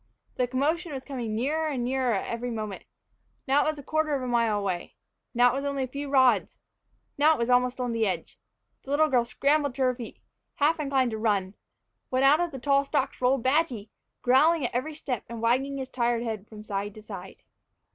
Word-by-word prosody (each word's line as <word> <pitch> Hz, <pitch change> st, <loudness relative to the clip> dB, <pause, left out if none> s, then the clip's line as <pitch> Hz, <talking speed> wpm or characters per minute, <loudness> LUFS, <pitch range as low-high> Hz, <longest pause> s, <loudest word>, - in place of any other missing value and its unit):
The 250 Hz, -, 0 dB
commotion 305 Hz, +6 st, -1 dB
was 265 Hz, -1 st, -6 dB
coming 240 Hz, -6 st, -4 dB
nearer 305 Hz, +7 st, 0 dB
and 265 Hz, -5 st, -2 dB
nearer 255 Hz, -1 st, +1 dB
every 235 Hz, +5 st, -3 dB
moment. 215 Hz, -4 st, -5 dB, 0.6 s
Now 275 Hz, +2 st, +4 dB
it -, -, +1 dB
was 310 Hz, -, -3 dB
a 285 Hz, -, -9 dB
quarter 310 Hz, 0 st, 0 dB
of 265 Hz, -, -3 dB
a -, -, -3 dB
mile 230 Hz, -3 st, +2 dB
away 190 Hz, -4 st, -3 dB, 0.4 s
now 245 Hz, +1 st, +5 dB
it -, -, -1 dB
was 275 Hz, -, -3 dB
only 280 Hz, -1 st, -1 dB
a -, -, -3 dB
few 280 Hz, +2 st, -6 dB
rods 260 Hz, -3 st, +3 dB, 0.6 s
now 310 Hz, +2 st, +5 dB
it -, -, -6 dB
was 235 Hz, +1 st, 0 dB
almost 250 Hz, +1 st, +2 dB
on 250 Hz, -1 st, -1 dB
the 225 Hz, -2 st, +1 dB
edge. 190 Hz, -, -4 dB, 0.4 s
The -, -, -14 dB
little 305 Hz, +2 st, +3 dB
girl 245 Hz, -3 st, +3 dB
scrambled 285 Hz, +2 st, +1 dB
to 270 Hz, -, 0 dB
her 255 Hz, -1 st, +3 dB
feet, 240 Hz, -2 st, -9 dB, 0.4 s
half 310 Hz, +3 st, +2 dB
inclined 270 Hz, -4 st, +1 dB
to 220 Hz, -, -4 dB
run, 200 Hz, -4 st, 0 dB, 0.6 s
when 255 Hz, +1 st, +1 dB
out 285 Hz, +3 st, +6 dB
of 350 Hz, 0 st, 0 dB
the 270 Hz, -, -7 dB
tall 275 Hz, +2 st, +2 dB
stalks 270 Hz, -2 st, -2 dB
rolled 255 Hz, -1 st, +2 dB
Badgy, 260 Hz, -7 st, +1 dB, 0.3 s
growling 290 Hz, +4 st, +4 dB
at -, -, -3 dB
every 295 Hz, +6 st, -2 dB
step 250 Hz, -7 st, -4 dB
and 235 Hz, -1 st, -6 dB
wagging 260 Hz, +5 st, +1 dB
his 265 Hz, -1 st, -4 dB
tired 240 Hz, -2 st, 0 dB
head 220 Hz, -3 st, -4 dB
from 215 Hz, -1 st, -10 dB
side 205 Hz, -1 st, -4 dB
to 215 Hz, -, -11 dB
side! -, -, -9 dB
255 Hz, 215 wpm, -27 LUFS, 235-280 Hz, 0.6 s, out